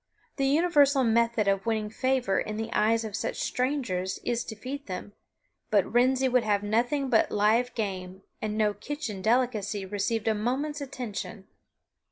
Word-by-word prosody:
The 275 -1 +1
universal 285 -3 +4
method 230 -2 +2
of 195 +2 +1
winning 215 -2 -1
favor 255 -4 +1
in 215 0 -3
the 225 +1 -4
eyes 225 +1 +2
of 210 -2 -5
such - - -3
strangers 245 -9 -1
is 240 -1 -1
to 220 - -7
feed 275 +6 -7
them; 195 +2 -6 0.6
but 205 -3 +3
Wrensie 255 +3 +3
would 250 -1 +3
have 205 -1 +1
nothing 245 +7 +1
but 230 -4 +3
live 225 +4 +2
game, 190 -3 -4 0.2
and 215 0 -2
no 210 -1 +2
kitchen 230 -7 -5
delicacy 215 -3 +1
received 210 +3 -2
a 220 - +4
moment's 270 +8 -2
attention. 245 -7 -6
225 Hz, 160 wpm, -28 LUFS, 210-255 Hz, 0.6 s, universal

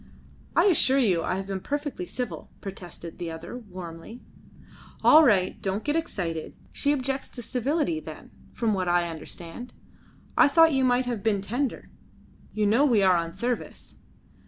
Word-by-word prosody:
"I - - +5
assure 300 -8 +4
you 195 -11 +3
I 185 - -1
have 190 0 -4
been 195 -1 -3
perfectly 290 -6 -4
civil," 250 -2 -5
protested 175 -3 -8
the 175 -1 -4
other 165 +7 -7
warmly. 185 -1 -9 0.8
"All 315 +1 +8
right. 200 -9 +2
Don't 195 +2 -2
get 295 +1 0
excited. 175 - -3 0.2
She 285 - 0
objects 270 -1 -2
to 240 - -8
civility, 290 +8 0
then, - - -10 0.2
from 225 -3 0
what 185 -2 -1
I 175 0 +2
understand. 165 +7 -8 0.6
I - - +7
thought 325 +2 +5
you 265 -1 +2
might 250 0 +3
have 240 -4 -3
been 205 -2 +1
tender. 245 +6 -3 0.6
You 215 -1 0
know 225 +7 +4
we 235 -8 +4
are 185 -1 +5
on 165 -1 -1
service." 235 +7 -4
220 Hz, 160 wpm, -26 LUFS, 180-265 Hz, 0.8 s, All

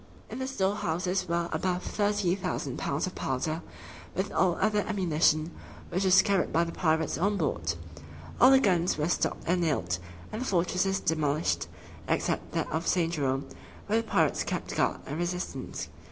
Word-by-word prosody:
In - - -5
the 260 - -2
storehouses 190 -6 -1
were 170 0 +1
above 180 +3 -1
thirty 205 -3 +1
thousand 180 -8 -3
pounds 140 +1 -1
of 185 - -5
powder, 155 +5 -2 0.5
with 190 +1 -1
all 180 -2 +2
other 210 +1 +2
ammunition, 165 -6 +1 0.4
which 185 +3 0
was 190 0 +7
carried 200 -3 +1
by 165 - +3
the 170 - -3
pirates 160 -4 +1
on 200 +3 +2
board. 85 - -1 0.6
All 250 - +8
the 270 0 +7
guns 180 - +2
were 150 +1 0
stopped 175 - 0
and 175 +2 +2
nailed, 90 - 0 0.3
and 220 - -4
the - - -2
fortresses 185 +1 +1
demolished, 155 -1 0 0.4
except - - -1
that - - -1
of 160 +2 -2
St. 170 -2 +2
Jerome, 135 -3 0 0.4
where 220 +2 +2
the 230 - -13
pirates - - +2
kept - - -3
guard - - +1
and 145 +4 -4
resistance. 180 +1 -3
175 Hz, 170 wpm, -29 LUFS, 160-195 Hz, 0.6 s, All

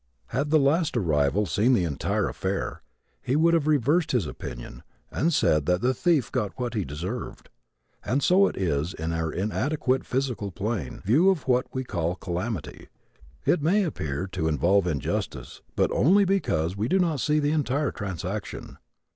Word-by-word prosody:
Had 140 +4 -1
the 155 - +5
last 150 0 +2
arrival 80 0 +1
seen 105 - +2
the 100 - +3
entire 75 -5 -1
affair - - -3 0.4
he 130 - -1
would 165 +2 +4
have 160 -3 +2
reversed 150 +3 +2
his 120 -9 +2
opinion - - -8 0.3
and 165 +5 +1
said 75 - +2
that 90 +1 +2
the 125 +2 +2
thief 160 -5 +1
got 105 -7 -2
what 120 -2 -2
he 105 -4 -1
deserved. 90 - -6 0.5
And 130 +6 0
so 195 +2 +5
it - - -5
is 80 -2 -1
in 80 +1 -3
our 80 -1 -1
inadequate 130 - -1
physical 125 -6 -2
plane 100 - -4
view 150 - +4
of 180 -8 0
what 125 -1 +2
we 130 - -3
call 85 -7 -2
a - - -8
calamity. 90 +1 -5 0.6
It 170 - +3
may 190 +7 +3
appear 80 - -3
to 80 -4 -1
involve 85 +6 +2
an 85 - +1
injustice, 70 - -4
but - - +2
only 195 +8 +4
because 95 - 0
we 105 +3 -1
do 190 - +2
not 165 -6 +1
see 150 +4 +1
the 145 0 +1
entire 145 -1 0
transaction. 95 +1 -6
120 Hz, 175 wpm, -26 LUFS, -, 0.6 s, the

